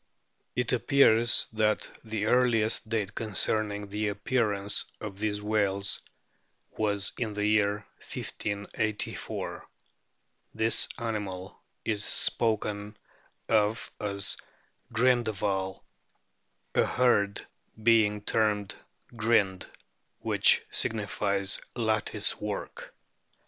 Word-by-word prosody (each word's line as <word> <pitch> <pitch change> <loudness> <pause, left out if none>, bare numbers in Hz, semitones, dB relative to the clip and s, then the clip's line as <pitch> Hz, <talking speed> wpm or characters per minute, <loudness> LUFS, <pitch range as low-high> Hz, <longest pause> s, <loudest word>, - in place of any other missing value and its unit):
It 125 0 0
appears 120 -2 +5
that 110 -1 +1 0.2
the 110 -2 -3
earliest 115 -3 +3
date 105 -3 -1
concerning 105 -1 0
the 105 +1 -2
appearance 105 -1 0
of 100 -2 -7
these 105 -1 -1
whales 100 -2 +1 0.7
was 100 -2 +1
in 110 -3 -2
the 105 0 -1
year 105 -1 +1 0.3
1584. 105 +1 -4 0.9
The 110 +1 +4
animal 100 -6 -5 0.2
is 105 -2 0
spoken 105 -2 +1 0.5
of 110 +1 +1
as 100 -1 +1 0.3
" - - -39
Grindehval," 110 -6 0 0.9
a - - +4
herd 100 -5 +1 0.4
being: 110 -2 +4
termed 105 -3 0 0.4
"Grind/ 105 -5 +1 0.5
which - - +3
signifies 100 -2 0
lattice 110 -2 0
work. 105 -1 -6
105 Hz, 85 wpm, -28 LUFS, 100-110 Hz, 0.9 s, appears